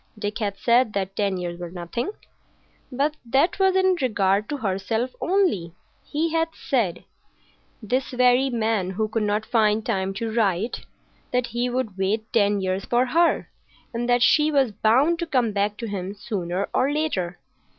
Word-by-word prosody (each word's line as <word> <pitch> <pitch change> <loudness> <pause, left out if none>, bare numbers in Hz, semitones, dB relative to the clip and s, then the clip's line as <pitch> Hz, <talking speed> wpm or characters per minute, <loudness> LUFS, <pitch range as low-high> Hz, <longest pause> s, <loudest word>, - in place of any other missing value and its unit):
Dick 210 +1 -3
had 200 -3 -2
said 235 0 +3
that 195 -1 -2
ten 200 -2 0
years 175 -1 -5
were 175 -1 -5
nothing,—but 250 - -6
that 270 +11 +1
was 380 -1 +3
in 375 -1 +4
regard 205 -4 +1
to 290 - -2
herself 220 +2 -1
only. 340 - +1 0.3
He 320 +2 -1
had 325 0 +2
said—this 240 +2 -4
very 250 +1 +3
man 220 -5 0
who 215 +3 -1
could 220 +1 -2
not 210 +1 0
find 220 -2 +2
time 195 -3 -1
to 225 +2 -3
write—that 225 +3 -2
he 240 +1 -2
would 240 -6 -3
wait 215 +4 -1
ten 205 -3 +3
years 190 +1 -1
for 245 +1 +2
her, 335 +6 +2 0.4
and 240 +1 -2
that 245 0 +4
she 300 +4 +4
was 270 -5 +2
bound 255 - +3
to 340 - -2
come 250 -7 +1
back 205 +1 -1
to 235 - -5
him 195 -1 -4
sooner 195 -3 -3
or 270 +2 +2
later. 195 - -1
225 Hz, 160 wpm, -24 LUFS, 195-255 Hz, 0.4 s, in